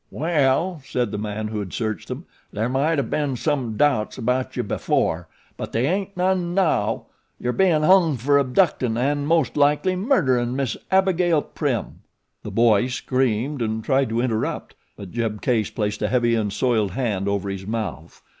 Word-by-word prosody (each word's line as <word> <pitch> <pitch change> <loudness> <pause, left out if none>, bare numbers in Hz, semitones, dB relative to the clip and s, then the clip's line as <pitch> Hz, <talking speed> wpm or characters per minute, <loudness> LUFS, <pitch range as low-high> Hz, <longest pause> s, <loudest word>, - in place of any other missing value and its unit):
"Well," 155 +2 +1
said 125 -5 -2
the 105 - -3
man 105 0 -3
who 110 -1 -3
had 100 -3 -6
searched 110 -2 -3
them. - - -6 0.3
"There 110 +3 -1
might 140 +5 +1
o' 140 - +2
been 145 -2 -1
some 125 -5 -1
doubts 135 -6 +1
about 125 +1 -1
you - - 0
before, 80 +1 -1 0.3
but - - -6
they 115 +3 +1
aint 190 +4 -2
none 180 -1 0
now. 135 - +1 0.3
You're 125 0 -1
bein' 175 -5 +3
hung 170 -4 +5
fer 140 +4 +3
abductin' 130 -4 +1
of 120 - 0
an' 145 +1 0
most 160 -4 +2
likely 150 +5 +2
murderin' 130 - +1
Miss 135 -4 -1
Abigail 180 -4 +3
Prim." 135 -7 -3 0.4
The - - -7
boy 115 +1 +3
screamed 130 +1 -1
and 110 -1 -2
tried 135 0 +2
to 115 +1 0
interrupt; 115 -3 -2 0.2
but 100 -3 -9
Jeb 115 -3 -2
Case 110 -4 0
placed 105 -1 -3
a - - +1
heavy 120 -2 +2
and 110 -3 0
soiled 110 -4 +1
hand 105 -6 -1
over 100 -1 -1
his 95 0 -6
mouth. 95 - -5
125 Hz, 175 wpm, -23 LUFS, 110-150 Hz, 0.4 s, hung